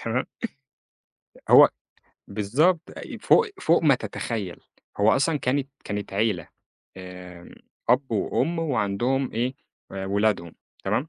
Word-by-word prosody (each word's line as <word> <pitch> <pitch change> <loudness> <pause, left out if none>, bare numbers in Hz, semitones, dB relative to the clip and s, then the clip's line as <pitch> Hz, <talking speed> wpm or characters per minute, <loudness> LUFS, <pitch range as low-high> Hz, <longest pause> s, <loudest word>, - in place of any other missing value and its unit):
تمام. 115 +3 -1 1.2
هو - - +9 0.6
بالضبط، 130 - +2 0.2
أي - - -8
فوق 465 - +5
فوق 170 +1 +3
ما 150 -4 +6
تتخيل، 110 -6 -5 0.4
هو 105 +2 +5
أصلًا 145 +4 +1
كانت 135 +1 0 0.2
كانت 100 -1 -4
عيلة، 100 -5 0 0.5
آمم، 90 -1 -11 0.3
أب 130 +2 +3
وأم 165 +10 0
وعندهم 130 -2 0
إيه 120 +4 -1 0.4
آآ 95 0 -4
ولادهم، 100 -4 0 0.3
تمام، 110 +10 0
115 Hz, 115 wpm, -25 LUFS, 100-135 Hz, 1.2 s, هو